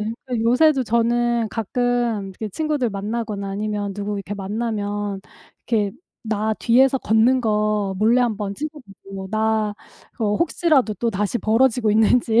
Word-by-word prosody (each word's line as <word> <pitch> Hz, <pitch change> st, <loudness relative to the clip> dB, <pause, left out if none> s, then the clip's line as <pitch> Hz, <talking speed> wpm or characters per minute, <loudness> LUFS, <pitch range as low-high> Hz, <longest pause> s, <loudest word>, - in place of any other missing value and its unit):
네. 215 Hz, +2 st, -3 dB
그래서 245 Hz, -3 st, -2 dB
요새도 265 Hz, +4 st, +4 dB
저는 235 Hz, 0 st, +1 dB
가끔 235 Hz, -2 st, -1 dB
이렇게 210 Hz, +3 st, -6 dB
친구들 300 Hz, +1 st, -1 dB
만나거나 205 Hz, 0 st, -4 dB
아니면 205 Hz, 0 st, -3 dB
누구 205 Hz, 0 st, -3 dB
이렇게 200 Hz, +1 st, -5 dB
만나면 205 Hz, -1 st, -3 dB, 0.5 s
이렇게 210 Hz, -4 st, +1 dB, 0.3 s
"나 220 Hz, -1 st, -1 dB
뒤에서 260 Hz, +4 st, +3 dB
걷는 230 Hz, +4 st, +3 dB
거 210 Hz, -3 st, 0 dB
몰래 230 Hz, +4 st, +4 dB
한번 210 Hz, -4 st, -1 dB
찍어 305 Hz, +3 st, -6 dB, 0.3 s
보고 195 Hz, -1 st, -7 dB
나 220 Hz, -1 st, 0 dB, 0.5 s
어 210 Hz, -1 st, +1 dB
혹시라도 310 Hz, -, +2 dB
또다시 210 Hz, +1 st, -1 dB
벌어지고 225 Hz, +1 st, +2 dB
있는지." 225 Hz, +2 st, +3 dB
220 Hz, 320 characters per minute, -21 LUFS, 205-240 Hz, 0.5 s, 요새도